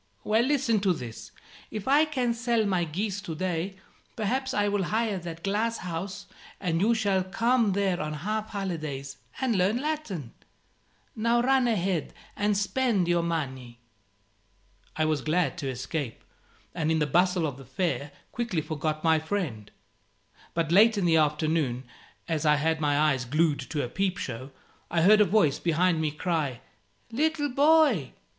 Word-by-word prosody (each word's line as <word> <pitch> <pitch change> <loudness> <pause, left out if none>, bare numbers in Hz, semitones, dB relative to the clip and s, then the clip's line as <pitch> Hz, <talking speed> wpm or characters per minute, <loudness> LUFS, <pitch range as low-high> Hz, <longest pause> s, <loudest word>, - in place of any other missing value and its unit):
Well, 220 +2 +3
listen 250 -4 +2
to 195 -2 +2
this: 120 -7 -8 0.4
if 215 -2 -6
I 290 +3 +5
can 255 -6 0
sell 235 -1 +1
my 185 -4 +1
geese 195 +5 -3
to 165 -4 -6
day, 185 +2 -2 0.4
perhaps 260 +5 -1
I 205 -5 +1
will 205 -1 0
hire 215 -1 0
that 170 -1 -8
glass 220 +4 0
house, 185 +3 -5 0.3
and 170 -3 0
you 230 +3 +3
shall 200 -4 +1
come 230 +3 +2
there 195 -2 0
on 150 0 -3
half 215 0 -2
holidays, 155 -10 -4 0.2
and 255 -4 +1
learn 190 +5 +2
Latin. 260 - -4 0.8
Now 235 +2 +2
run 260 0 +3
ahead 190 - -1 0.2
and 205 0 +1
spend 205 -1 +1
your 175 0 +2
money." 130 -8 -4 1.2
I 155 - +1
was 155 -2 0
glad 170 +6 0
to 140 -4 -3
escape, 130 0 -4 0.5
and 160 -2 0
in 160 - +2
the 150 - +2
bustle 175 +3 +2
of 140 -4 -4
the 135 - -11
fair 145 +2 -2 0.2
quickly 225 -10 -2
forgot 155 0 -3
my 160 -1 +4
friend. 155 - -3 0.9
But 165 -1 0
late 215 +4 +6
in 195 - +1
the 165 -1 +4
afternoon, 150 -4 +1 0.4
as 160 -2 -1
I 150 -1 +5
had 160 +1 0
my 145 -1 +2
eyes 150 -4 +2
glued 150 +4 +1
to 150 -2 -1
a - - -2
peep 190 +7 -1
show, 130 +2 -5 0.4
I 165 -1 +1
heard 210 +3 +7
a - - +6
voice 170 -8 +2
behind 170 0 +2
me 155 - +1
cry 150 -5 -2 0.5
"Little 290 +3 0
boy!" 280 - +4
180 Hz, 165 wpm, -27 LUFS, 155-215 Hz, 1.2 s, heard